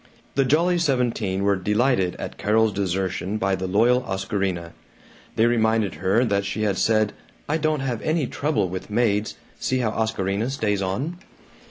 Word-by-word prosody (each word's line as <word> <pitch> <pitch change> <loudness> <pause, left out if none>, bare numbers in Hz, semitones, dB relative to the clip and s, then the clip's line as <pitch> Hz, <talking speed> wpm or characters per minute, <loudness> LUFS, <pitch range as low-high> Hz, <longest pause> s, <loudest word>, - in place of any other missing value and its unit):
The 135 - +2
Jolly 170 +6 +3
Seventeen 120 - 0
were 100 0 +3
delighted 105 0 +1
at - - -7
Carol's 110 0 +2
desertion 95 0 -1
by 95 -2 0
the 95 0 -2
loyal 115 +6 +3
Oscarina. 95 -5 -2 0.6
They 115 - +4
reminded 110 -5 +2
her 100 +7 +3
that 100 -3 +1
she 100 +2 -3
had 100 -2 0
said, 110 -2 +2 0.3
"I 150 - +1
don't 155 -2 0
have 125 -4 -2
any 155 -2 0
trouble 140 -8 0
with 95 +3 -6
maids; 105 -1 +1 0.2
see 130 - 0
how 120 -4 0
Oscarina 110 0 -1
stays 105 -7 -1
on." 135 - -3
110 Hz, 160 wpm, -23 LUFS, 95-125 Hz, 0.6 s, They